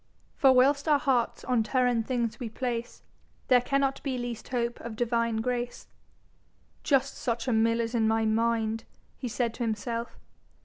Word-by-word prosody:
For 270 - +5
whilst 280 +3 +4
our 300 -2 +5
Hearts 260 -4 0
on 250 -3 +2
Terrhen 245 0 +1
things 235 -2 -2
we 240 -3 -4
place, 240 0 -4 0.5
There 250 -1 +6
cannot 275 +1 0
be 265 -3 -2
least 240 -2 -5
hope 240 -1 -2
of 235 -2 -7
Divine 230 -1 0
grace. 245 0 -3 1.0
'Just 275 -1 +1
such 235 0 -2
a 250 - +2
mill 230 +1 +3
is 230 0 -2
my 225 -1 +2
mind,' 225 0 +1 0.3
he 255 - -5
said 235 0 -1
to 240 - -4
himself. 230 +1 -3
240 Hz, 160 wpm, -28 LUFS, 230-255 Hz, 1.0 s, There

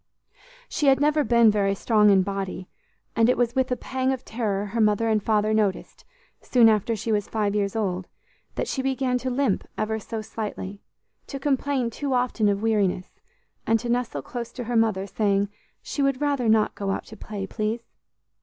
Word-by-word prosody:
She 295 - -1
had 270 0 +5
never 300 +1 +3
been 235 -4 +5
very 200 -1 +1
strong 210 0 +3
in 195 -2 +5
body, 195 -2 -4 0.5
and 230 +1 +4
it 250 - +3
was 240 -1 +1
with 260 -1 +1
a - - +2
pang 260 +1 -1
of 260 -2 -4
terror 210 -3 -2
her 225 +3 -2
mother 215 +1 +3
and 215 -1 +2
father 215 0 +1
noticed, 210 -3 -1 0.4
soon 235 -3 +5
after 220 +1 +1
she 220 +2 -3
was 205 -2 0
five 210 -2 -1
years 200 -1 -1
old, 185 -4 -2 0.5
that - - -2
she 265 - -2
began 260 -1 0
to 255 - -3
limp, 255 -5 0
ever 220 +1 -1
so 220 +1 -5
slightly; 205 -2 -6 0.5
to 275 - -5
complain 270 -3 0
too 275 +2 -2
often 245 -4 +1
of 200 +1 -1
weariness, 200 -5 0 0.5
and 225 0 +3
to 240 - -5
nestle 235 - -1
close 235 -1 -6
to 250 - -5
her 240 +1 -3
mother, 220 -4 +2
saying 200 -1 0 0.3
she 285 - -3
"would 275 -2 +1
rather 280 -5 +1
not 220 -1 +3
go 200 -1 -4
out 195 - -2
to 220 - -11
play, 205 -3 -6
please." 220 +3 -3
220 Hz, 190 wpm, -25 LUFS, 205-250 Hz, 0.5 s, had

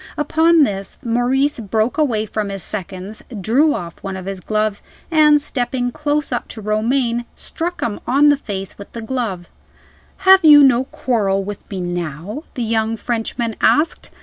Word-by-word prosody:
Upon 320 +2 +4
this, 195 -5 -3
Maurice 250 +4 +1
broke 220 +2 -1
away 230 -8 +1
from 210 -1 -3
his 195 -2 -3
seconds; 195 +1 -5 0.2
drew 265 - +2
off 170 -1 -7
one 195 -1 -5
of 185 - -8
his 195 -1 -5
gloves; 215 +1 -1 0.3
and 300 -2 +5
stepping 245 -3 -2
close 295 0 -1
up 245 - -2
to 225 - -9
Romayne, 235 +3 0
struck 350 +1 -4
him 210 -3 -2
on 285 +4 +5
the 290 - +4
face 195 -8 -6
with 200 - -11
the 230 - -6
glove. 220 -8 -3 0.8
"Have 380 -1 +7
you 295 -2 +9
no 260 -1 +4
quarrel 200 -8 0
with 205 +1 -8
me 190 -3 -4
now?" 175 - -5
the 245 - -2
young 225 0 0
Frenchman 230 0 -3
asked. 310 +3 +2
230 Hz, 165 wpm, -19 LUFS, 200-280 Hz, 0.8 s, you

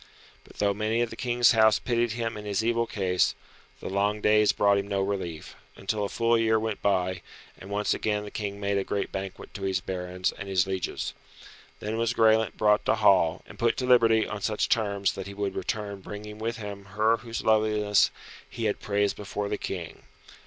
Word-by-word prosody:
But - - -17
though 100 -1 +1
many 110 +3 0
of 120 - -4
the - - -7
King's 120 -1 +3
house 110 -2 +5
pitied 120 -2 0
him 115 -1 -3
in 105 - -7
his 105 +1 -1
evil 115 0 +1
case, 90 -3 +1 0.4
the - - -7
long 100 +2 0
days 105 0 +4
brought 100 -1 +3
him 100 - -4
no 100 -1 -1
relief, 95 -5 -4 0.2
until 105 +1 -2
a 100 - -2
full 115 0 +2
year 110 -1 +3
went 110 -1 -3
by, 95 -3 +1 0.3
and 95 - -12
once 105 +1 0
again 105 -1 -1
the 105 - -8
King 100 -1 -4
made 100 0 0
a - - -1
great 100 +1 -3
banquet 95 -1 -6
to 100 - -8
his 95 -1 0
barons 90 0 -3
and 100 - -8
his 95 -2 +2
lieges. 95 -1 -3 0.7
Then 110 +2 -3
was 115 +1 0
Graelent 110 -4 +3
brought 105 -1 +3
to - - +3
hall, 95 -7 +3
and - - -14
put 115 -1 +2
to 130 - -1
liberty 115 -3 +5
on 105 -1 -5
such 110 +1 0
terms 100 -4 +1
that 95 0 -6
he 100 - -8
would 100 -1 -2
return 100 -1 -3
bringing 105 +2 -8
with 115 +2 -3
him 100 -2 -7
her 110 +2 +4
whose 115 -1 -6
loveliness 105 -1 +3 0.4
he - - -4
had - - 0
praised 100 0 0
before 105 0 -4
the 105 - -1
King. 90 -4 -6
105 Hz, 205 wpm, -27 LUFS, 100-110 Hz, 0.7 s, house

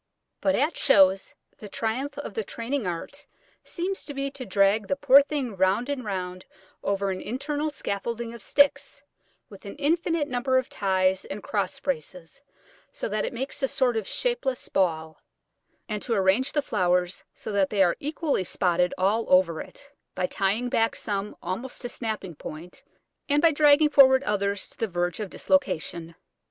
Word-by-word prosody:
But 285 - +2
at 295 +6 0
shows, 195 -6 +4 0.2
the 210 - -9
triumph 240 +8 -3
of - - -6
the 450 - -2
training 235 - -3
art 175 +11 -6 0.4
seems 375 +2 -4
to 285 - -7
be 275 0 -2
to 255 -3 -8
drag 200 +2 +2
the 280 - 0
poor 280 0 +7
thing 280 -6 -3
round 190 +7 +1
and 280 -3 -2
round 185 -3 -4 0.4
over 200 0 0
an 185 - -4
internal 290 +6 -2
scaffolding 230 -2 -4
of 235 - -10
sticks, 285 +8 +2 0.4
with 200 - -14
an 200 - -8
infinite 320 +1 0
number 260 0 +1
of 255 - 0
ties 190 -1 +1
and 195 +1 -7
cross 200 -3 -2
braces, 180 - -5 0.5
so - - -4
that 215 +1 -1
it - - -3
makes 260 +3 -5
a 270 - +2
sort 255 -3 +1
of 220 -3 -2
shapeless 385 - -2
ball, 160 -4 -1 0.7
and 210 -2 -3
to 230 - -1
arrange 195 +7 +2
the 295 - +1
flowers 180 -5 0
so - - -7
that 200 -2 +2
they 200 -2 +3
are 175 -2 +2
equally 300 - -1
spotted 180 0 +1
all 205 +5 +1
over 180 -3 +4
it, 285 0 -13 0.2
by 185 - 0
tying 200 +6 0
back 225 -2 +1
some 205 -1 -3
almost 190 +9 -5
to - - -2
snapping 215 -7 -4
point, 160 +3 -10 0.5
and 290 +1 +4
by 330 +2 +5
dragging 295 0 +5
forward 265 -2 +7
others 200 -2 -1
to - - -16
the 225 - 0
verge 175 -1 -2
of 210 -3 -4
dislocation. 170 - -1
215 Hz, 170 wpm, -26 LUFS, 190-275 Hz, 0.7 s, poor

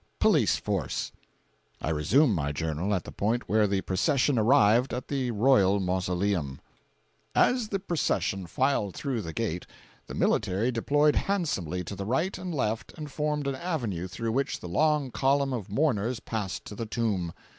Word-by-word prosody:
Police - - +4
Force. - - -2 0.7
I 80 - -2
resume 110 - +3
my 75 -5 -1
journal 80 +5 -2
at 90 - -2
the - - -9
point 115 +4 -1
where 105 +2 +3
the 100 -1 0
procession 130 - +1
arrived 120 +1 +4
at 125 - -6
the 135 -3 -1
royal 105 -4 +4
mausoleum: 90 -5 -1 0.8
As 245 -3 +3
the 200 - -1
procession 100 - -1
filed 130 -2 0
through 130 -6 -2
the 80 - -6
gate, 90 -4 -3 0.4
the - - -7
military 100 +7 +1
deployed 145 +5 +2
handsomely 95 - -1
to 100 - -6
the 100 +1 -5
right 160 - 0
and 185 0 -5
left 115 -7 -2
and 150 -2 -7
formed 150 0 -1
an 140 - 0
avenue 125 - -3
through 115 +5 -3
which 135 +3 -1
the - - -8
long 145 - +1
column 135 +1 +1
of 110 -7 -4
mourners 120 -2 0
passed 105 -6 -4
to - - -8
the 115 +2 -4
tomb. 105 -7 -1
115 Hz, 165 wpm, -28 LUFS, 95-140 Hz, 0.8 s, Police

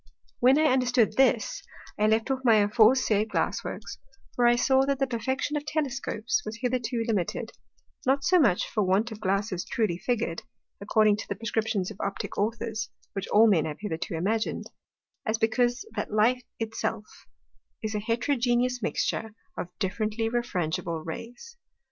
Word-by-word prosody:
When 260 +3 +5
I 310 - +3
understood 250 -6 +3
this, 270 - +2 0.3
I 210 - +2
left 220 +4 +2
off 265 - 0
my 230 -3 +6
aforesaid 215 +1 +4
Glass - - -1
Works; - - -7 0.4
for 240 -1 +4
I 240 - +5
saw, 265 +2 +3
that 280 -1 +1
the 270 - +1
perfection 260 +4 -2
of 295 - -1
Telescopes 300 - -1
was 220 - -6
hitherto 245 -2 -1
limited, 205 -7 -1 0.5
not 275 +2 +2
so 365 +5 +4
much 210 - +3
for 215 - -1
want 200 +5 +2
of 215 - -7
Glasses 195 -2 0
truly 200 -7 -1
figur'd, 230 -9 -1 0.4
according 210 0 +3
to - - -6
the 200 - -3
prescriptions 220 -2 -1
of - - -10
Optick 200 0 -4
Authors 225 +1 -2 0.2
(which 195 -1 -4
all 215 +2 +6
Men 180 -8 +3
have 150 -1 -4
hitherto 185 -2 -4
imagin'd), 215 +7 -1 0.5
as 220 +1 0
because 240 +3 +1
that 210 - -3
Light 230 +4 +2
it 225 -1 -4
self 210 - -2 0.8
is 215 0 -2
a 210 - -1
Heterogeneous 245 +2 0
mixture 220 0 -2 0.2
of - - -4
differently 215 +3 -1
refrangible 170 -8 -2
Rays. 245 - -8
225 Hz, 160 wpm, -27 LUFS, 210-250 Hz, 0.8 s, my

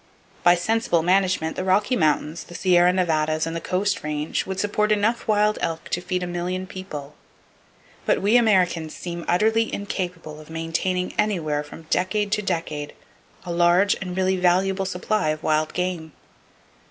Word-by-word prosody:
By 175 0 +6
sensible 180 -2 +1
management 185 -3 +1
the - - -3
Rocky 200 +6 +2
Mountains, 155 -1 0
the 175 - -12
Sierra 180 -1 +4
Nevadas 155 -4 +1
and 165 0 -4
the 165 - -3
Coast 195 +3 -1
Range 150 +2 -2
would 190 0 -4
support 210 +1 +1
enough 215 +3 +1
wild 210 0 +2
elk 165 -1 -3
to 175 - -1
feed 180 0 -2
a - - -1
million 180 +1 -3
people. 170 -7 -8 0.9
But - - +3
we 205 +4 +2
Americans 185 -9 +2
seem 170 -1 -6
utterly 220 +5 +2
incapable 180 -6 -5
of 155 - -14
maintaining 165 +3 -2
anywhere 165 -9 0
from 160 +2 -12
decade 205 +2 0
to 210 0 +1
decade 165 -6 -3 0.5
a 175 - -4
large 175 +3 +4
and 180 -1 -5
really 190 0 +2
valuable 190 +2 +2
supply 185 -1 -1
of 155 0 -3
wild 155 0 +1
game. 180 -3 -3
180 Hz, 160 wpm, -23 LUFS, 165-195 Hz, 0.9 s, By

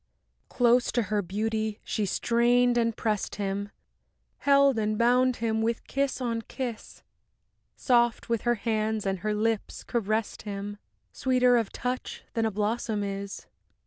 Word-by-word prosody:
V - - -48 0.5
Close 245 0 +4
to 240 - +1
her 210 0 0
beauty 215 +3 -2
she 210 -3 -1
strained 240 +4 +3
and 230 -2 +1
pressed 215 -3 -1
him, 200 0 -3 0.7
Held 280 -3 +4
and 215 0 0
bound 250 +2 +3
him 220 -1 -1
with 230 +1 -1
kiss 275 -1 -1
on 230 -3 -1
kiss; 240 -1 -6 0.7
Soft 240 -2 +2
with 230 -2 0
her 240 0 +2
hands 220 -1 -1
and 195 -1 -1
her 210 +3 -1
lips 220 0 -1
caressed 220 -2 -1
him, 205 0 -6 0.3
Sweeter 250 -1 +3
of 230 -4 +1
touch 250 +1 -4
than 225 -1 +1
a - - -2
blossom 210 +1 -1
is. 200 0 -5
225 Hz, 145 wpm, -27 LUFS, 210-240 Hz, 0.7 s, Close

